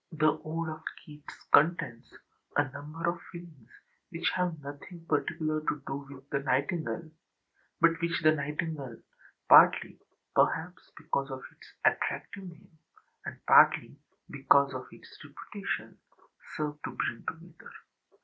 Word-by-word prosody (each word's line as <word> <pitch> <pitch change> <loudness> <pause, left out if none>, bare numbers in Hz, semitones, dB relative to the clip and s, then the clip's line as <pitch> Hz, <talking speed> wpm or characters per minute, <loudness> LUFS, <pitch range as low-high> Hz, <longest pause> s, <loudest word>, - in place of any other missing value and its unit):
The 155 -1 +2
ode 165 +1 -3
of 155 - -7 0.2
Keats 150 -1 -13
contains 145 -7 +3 0.5
a 145 -1 +3
number 155 +5 -5
of 170 0 0
feelings 165 -9 -12 0.4
which 170 -2 -1
have 180 -3 -1
nothing 145 +5 -10
particular 155 0 0
to 150 -2 -2
do 135 - -3
with 135 -1 -12
the 140 - +1
nightingale, 155 +4 -1 0.7
but 165 0 +4
which 170 -1 0
the 155 - +7
nightingale, 150 -3 -3 0.5
partly, - - +7 0.3
perhaps, 180 +3 +1
because 150 -3 -2
of 130 -1 -6
its - - -18
attractive 195 -1 0
name, 170 -1 -14 0.5
and - - -6
partly - - +6 0.4
because 140 0 +4
of 130 0 -6
its - - -14
reputation, - - -6 0.6
served 150 -1 -3
to - - -3
bring - - -2
together. - - -8
155 Hz, 130 wpm, -30 LUFS, 140-165 Hz, 0.7 s, the